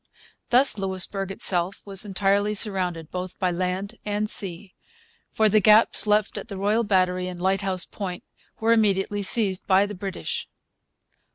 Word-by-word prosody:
Thus 250 -3 +4
Louisbourg 195 0 -1
itself 185 -1 +1
was 195 0 +2
entirely 205 +1 0
surrounded 180 -6 0
both 185 0 -6
by 185 -1 0
land 185 +5 -4
and 210 0 -2
sea; 190 -2 -2 0.6
for 220 - +1
the 215 +1 +3
gaps 215 +1 +5
left 210 0 +1
at - - -10
the 200 - -7
Royal 210 +4 +1
Battery 185 -3 0
and 180 -1 -7
Lighthouse 190 0 -1
Point 185 -4 -7 0.4
were 225 +1 +3
immediately 205 -2 +1
seized 195 -1 0
by 195 0 +4
the 205 - -7
British. 200 - -5
195 Hz, 150 wpm, -24 LUFS, 185-210 Hz, 0.6 s, gaps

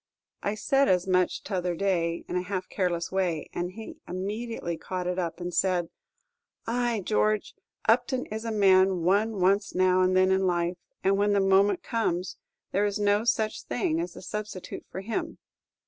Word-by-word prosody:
I 205 - -1
said 275 +5 +2
as 180 -1 +3
much 185 -1 +1
t' 200 - -6
other 180 -1 0
day, 170 -3 0
in - - -4
a 180 - +1
half 185 0 -4
careless 175 -3 -1
way, 180 -5 -1
and 175 +1 -3
he 220 +2 -9
immediately 200 0 -3
caught 180 +2 -5
it 180 +1 -1
up, 170 -1 -3
and 175 0 -4
said, 175 -1 +1 0.8
"Ay, 235 -3 0
George, 215 -1 +1 0.3
Upton 245 +3 +2
is 220 +1 -5
a 230 - -3
man 190 -3 +4
one 205 +4 +2
wants 195 +3 +2
now 185 0 +4
and 185 0 +3
then 185 0 +4
in 190 0 +2
life, 175 0 0 0.3
and 195 +1 +3
when 205 0 +2
the 200 - +3
moment 195 0 +3
comes, 185 -6 -1 0.3
there 200 - +1
is 200 - -2
no 205 +1 +2
such 220 -2 0
thing 155 +6 -1
as 175 0 -5
a - - -10
substitute 210 -2 -6
for 190 - -6
him." 220 +3 -3
190 Hz, 180 wpm, -27 LUFS, 180-210 Hz, 0.8 s, man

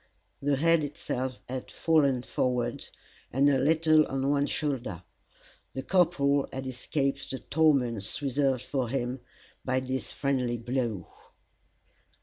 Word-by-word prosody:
The 140 0 +2
head 165 +2 +3
itself 130 -3 -3
had 130 0 -5
fallen 140 -6 +2
forward, 125 -2 -1 0.4
and 135 +3 +3
a 140 -2 +4
little 155 +1 +4
on 135 0 -1
one 145 0 +2
shoulder. 125 - -3 0.7
The 130 - -3
corporal 145 -7 +2
had 130 0 -5
escaped 135 +2 -2
the 135 - -2
torments 125 -6 +1
reserved 135 -2 0
for 130 -4 -2
him, 130 0 -2 0.4
by 130 0 +1
this 130 0 -3
friendly 130 -4 0
blow. 120 -4 -2
135 Hz, 125 wpm, -28 LUFS, 125-145 Hz, 0.7 s, a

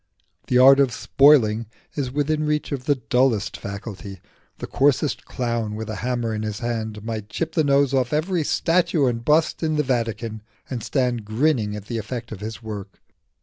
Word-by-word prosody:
The 125 - +2
art 135 +2 +8
of 135 -3 +3
spoiling 115 -4 +4 0.3
is 135 -4 -3
within 150 +2 0
reach 150 0 -1
of 130 -3 -4
the 145 - +3
dullest 125 -3 +1
faculty: 100 -1 -7 0.4
the - - -5
coarsest 145 +1 +1
clown 115 -4 -2
with 110 0 -5
a 105 - -5
hammer 120 -1 -2
in 105 - -3
his 105 -1 -3
hand 110 -3 -4
might 110 -2 -5
chip 160 +10 -3
the 160 - +2
nose 140 -1 +3
off 130 -2 +1
every 160 +3 0
statue 170 -1 +2
and 115 -2 -1
bust 155 +4 +2
in 155 -1 0
the 150 - +2
Vatican, 115 -4 -2 0.3
and 125 -3 -4
stand 125 -2 -1
grinning 110 -1 0
at 105 -1 -8
the 115 +1 -3
effect 115 +2 -6
of 110 - -6
his 110 +3 -7
work. 105 -3 -7
120 Hz, 185 wpm, -23 LUFS, 110-140 Hz, 0.4 s, art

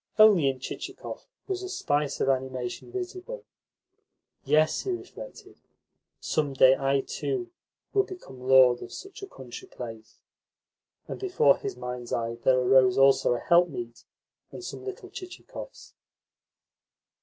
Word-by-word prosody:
Only 210 -9 +7
in 130 -1 -4
Chichikov 130 - -7 0.2
was 385 -1 -2
a 375 - -5
spice 145 - -1
of - - +1
animation 130 - -2
visible. 375 +6 -6 1.0
"Yes," 155 +1 +3
he 395 - -5
reflected, 380 +7 -7 0.6
"some 145 -3 -1
day 130 0 +6
I, 135 0 +1
too, 360 - -3 0.4
will 400 - +5
become 360 - -10
lord 130 -1 +6
of - - -8
such 390 0 -10
a 395 - -6
country 125 - -10
place." 115 -3 -9 0.9
And - - -6
before 365 - +3
his - - -5
mind's 125 -1 -6
eye 115 0 -1
there 130 - +5
arose 125 0 +5
also 135 -2 +5
a - - -3
helpmeet 130 -10 +1 0.5
and - - -9
some - - -7
little 385 -1 -7
Chichikovs. 390 +7 -10
140 Hz, 130 wpm, -27 LUFS, -, 1.0 s, Only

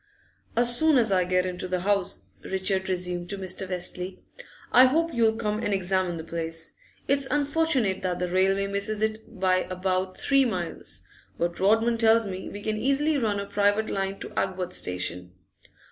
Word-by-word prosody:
'As 240 0 +4
soon 315 +2 +4
as 225 -4 +3
I 185 -2 +3
get 180 0 +1
into 180 0 -4
the 180 -1 -1
house,' 195 -1 0 0.2
Richard 190 0 -1
resumed 180 -1 -2
to 200 - -2
Mr. 185 0 -2
Westlake, 180 0 -5 0.5
'I 250 +2 +8
hope 330 +5 +1
you'll 225 -2 +3
come 215 -2 -1
and 205 -3 +1
examine 185 -2 0
the 160 - -6
place. 165 0 -3 0.3
It's 280 -1 +2
unfortunate 290 - +1
that 180 -1 -1
the 180 - -1
railway 190 +2 +2
misses 200 +2 -1
it 220 -1 -3
by 185 -1 +3
about 185 0 -1
three 275 -1 +3
miles, 180 -9 -4 0.3
but 170 0 -2
Rodman 225 +4 +3
tells 225 0 +5
me 190 -1 -5
we 205 0 -8
can 215 0 -1
easily 275 +6 +1
run 210 -4 0
a 200 - -3
private 205 +2 +1
line 195 0 -2
to - - -6
Agworth 185 -1 -2
station. 90 - -3
195 Hz, 175 wpm, -26 LUFS, 185-225 Hz, 0.5 s, I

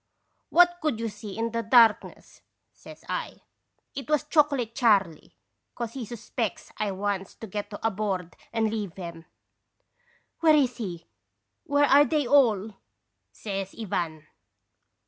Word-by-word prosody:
"'What 350 0 +5
could 300 -8 -1
you 230 0 -2
see 210 -1 -9
in 230 0 -1
the 230 0 -1
darkness?' 230 -1 +3 0.3
says - - -14
I. - - -4 0.5
'It 275 +1 -7
was 300 -1 +2
Chocolate 290 -6 +1
Charley, 200 - +1 0.4
'cause 235 -2 -5
he 260 -4 -5
suspects 225 -1 -5
I 215 - -1
wants 195 0 -3
to - - -9
get 205 0 -5
aboard 195 -5 -2 0.2
and 225 -2 0
leave 205 -6 -4
'em.' 170 -3 -8 0.6
" 480 0 -40
'Where 315 -2 +5
is 260 -5 +2
he? 180 -8 -6 0.6
Where 285 0 +3
are 285 +1 +6
they 295 +1 0
all?' 225 -7 +3 0.5
says 195 -2 -5
Ivan. 165 -7 -3
225 Hz, 135 wpm, -26 LUFS, 195-275 Hz, 0.6 s, are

